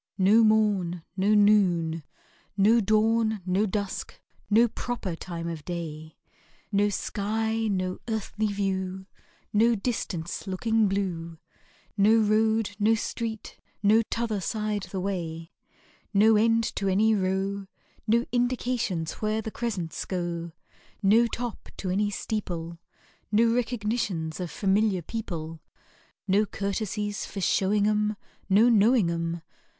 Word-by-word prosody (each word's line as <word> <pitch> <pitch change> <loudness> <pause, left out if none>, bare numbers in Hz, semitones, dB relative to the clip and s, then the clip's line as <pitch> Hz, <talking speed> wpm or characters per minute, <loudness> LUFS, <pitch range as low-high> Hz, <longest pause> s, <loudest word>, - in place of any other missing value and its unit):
No 205 +4 +5
morn 205 -6 +2
no 200 +3 +3
noon 180 -6 +3 0.6
No 215 +4 +5
dawn 220 +1 +2
no 190 +3 +1
dusk 200 0 -4 0.3
no 225 +3 +5
proper 225 -6 -4
time 170 0 -6
of 165 -3 -5
day 160 -3 -6 0.6
No 205 0 +3
sky 220 +3 -1
no 185 -2 -1
earthly 220 -1 -2
view 190 -2 -2 0.5
No 230 +3 +4
distance 195 -6 -3
looking 220 +3 +1
blue 175 -4 -3 0.6
No 210 +3 +5
road 220 0 +2
no 220 +2 +4
street 220 0 -5 0.2
no 215 +3 +5
"t'other 225 -4 -1
side 210 +1 -2
the 190 - -4
way" 170 -4 -4 0.6
No 215 +2 +6
end 225 +2 +3
to 195 - -1
any 210 +4 +3
Row 195 0 -1 0.4
No 235 +3 +3
indications 245 -8 -1
where 215 0 0
the 220 0 -5
Crescents 200 -10 -3
go 175 -2 -3 0.5
No 225 +4 +5
top 235 -1 -5
to 185 - -3
any 205 +2 +1
steeple 170 -6 -4 0.5
No 230 +2 +4
recognitions 210 -9 -1
of 180 -2 -3
familiar 195 +2 +1
people 165 -6 -5 0.7
No 205 +2 +3
courtesies 205 +1 -3
for 200 - -6
showing 200 +2 +2
'em 210 0 +1 0.3
No 210 +5 +6
knowing 220 -4 +4
'em! 170 0 -3
205 Hz, 120 wpm, -27 LUFS, 185-220 Hz, 0.7 s, No